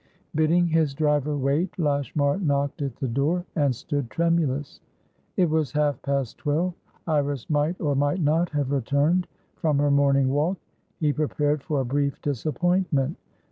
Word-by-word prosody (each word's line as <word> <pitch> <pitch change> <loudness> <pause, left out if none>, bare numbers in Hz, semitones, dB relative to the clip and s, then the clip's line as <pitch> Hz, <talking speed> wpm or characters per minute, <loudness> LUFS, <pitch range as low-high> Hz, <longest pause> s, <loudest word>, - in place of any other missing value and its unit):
Bidding 160 +3 +3
his 160 -4 +1
driver 150 -1 +1
wait, 145 +6 0
Lashmar 145 0 0
knocked 140 -5 0
at 135 -4 -3
the 135 - -3
door, 145 +9 0
and 140 -6 +2
stood 140 -1 -3
tremulous. 160 -4 0 0.6
It 180 - +4
was 155 -2 0
half 150 -1 +1
past 140 -4 -2
twelve; 160 +5 0 0.3
Iris 145 -5 -1
might 150 +4 +1
or 145 -3 0
might 145 +5 +1
not 165 +2 +2
have 145 -3 -1
returned 140 +7 +1 0.3
from 155 -4 +1
her 145 0 +2
morning 140 -1 +3
walk; 150 +7 +1 0.4
he 150 -2 +2
prepared 150 -1 0
for 145 -1 -1
a - - -2
brief 140 +2 -1
disappointment. 155 +1 0
145 Hz, 150 wpm, -25 LUFS, 140-160 Hz, 0.6 s, It